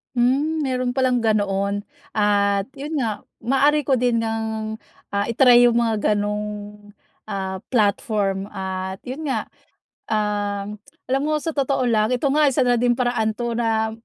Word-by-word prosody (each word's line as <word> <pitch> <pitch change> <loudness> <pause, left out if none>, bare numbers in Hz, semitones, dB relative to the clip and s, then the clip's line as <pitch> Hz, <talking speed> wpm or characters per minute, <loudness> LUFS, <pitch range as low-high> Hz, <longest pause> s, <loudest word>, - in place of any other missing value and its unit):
Hmm, 280 +6 +2
meron 255 -2 -1
palang 255 -2 +2
ganoon, 205 -2 0 0.3
at 200 0 +2
yun 295 +4 -6
nga 230 -7 -1 0.2
maaari 285 +5 +3
ko 265 -2 +2
din 235 -2 +1
ngang, 220 -1 -3 0.3
ah, 200 0 0
i-try 245 0 +6
yung 235 - +2
mga 225 -3 +2
ganong, 210 0 -2 0.8
ah, 190 -1 -3
platform 200 -3 0
at 190 -1 -5
yun 285 +5 -5
nga, 270 - 0 0.6
ah, 205 -2 -1 0.5
alam 270 +1 +2
mo 310 - +1
sa 325 - -1
totoo 275 -3 0
lang 220 -3 +2
ito 250 - -7
nga 300 +1 +4
isa 270 -1 +2
na 245 -1 +2
din 240 0 +2
paraan 235 -3 0
'to 235 0 -3
na 225 -1 0
230 Hz, 150 wpm, -22 LUFS, 205-255 Hz, 0.8 s, i-try